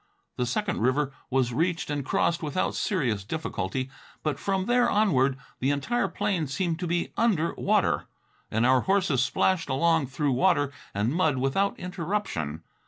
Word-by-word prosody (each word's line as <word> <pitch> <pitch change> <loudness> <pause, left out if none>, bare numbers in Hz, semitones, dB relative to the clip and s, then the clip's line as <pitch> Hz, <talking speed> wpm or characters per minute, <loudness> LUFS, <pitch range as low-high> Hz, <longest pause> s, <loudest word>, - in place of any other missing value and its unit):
The 125 - -1
second 205 - -1
river 135 +4 +1 0.2
was 130 -2 +1
reached 165 +3 0
and 145 -1 -1
crossed 170 +5 +1
without 155 +3 -1
serious 125 - 0
difficulty, 130 - -3 0.3
but 150 -3 -1
from 195 -1 0
there 245 +2 +3
onward 140 -11 +3 0.2
the 130 - +1
entire 195 - 0
plain 190 -4 -1
seemed 170 +3 -1
to 180 - -2
be 170 +1 -1
under 190 -8 +2
water, - - +1 0.4
and 110 +2 +1
our 130 0 +5
horses 190 -9 +2
splashed 180 +5 +1
along 160 +1 +2
through 135 +2 -1
water 145 0 +2 0.2
and 105 +6 +1
mud 160 -5 +2
without 135 +10 +1
interruption. 170 - -3
155 Hz, 155 wpm, -27 LUFS, 130-185 Hz, 0.4 s, our